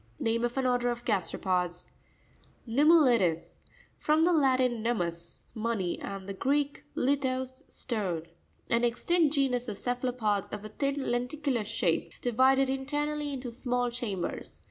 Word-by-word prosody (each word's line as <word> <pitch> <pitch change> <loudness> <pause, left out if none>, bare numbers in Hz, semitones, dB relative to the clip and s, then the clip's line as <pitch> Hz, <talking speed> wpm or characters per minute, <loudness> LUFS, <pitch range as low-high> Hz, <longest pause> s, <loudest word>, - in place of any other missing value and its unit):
Name 230 +1 0
of 240 +2 -4
an 265 - +1
order 245 -1 +2
of 240 0 -4
gasteropods. 180 -3 -1 0.8
Noummu.i'res.—F 235 - +2
rom 310 +1 +5
the 355 - +4
Latin 255 -6 +3
num 235 +1 0
mus, 170 -1 -5
money, 220 -6 -2
and 195 -1 -6
the 200 - -4
Greek, 285 +7 0
lithos, 260 -1 0
stone. 190 -9 -2 0.4
An 235 +1 +1
extinct 310 +6 +2
genus 255 -3 +1
of 210 -3 -4
cepha 245 +2 -1
lopods, 210 -5 -1
of 210 0 -6
a - - -6
thin 275 +4 -1
lenticular 250 0 -1
shape, - - 0
divided 260 +3 +3
internally 290 +2 -1
into 255 -3 -5
small 245 0 -1
cham 230 -7 -3
bers. - - -5
245 Hz, 145 wpm, -29 LUFS, 215-270 Hz, 0.8 s, rom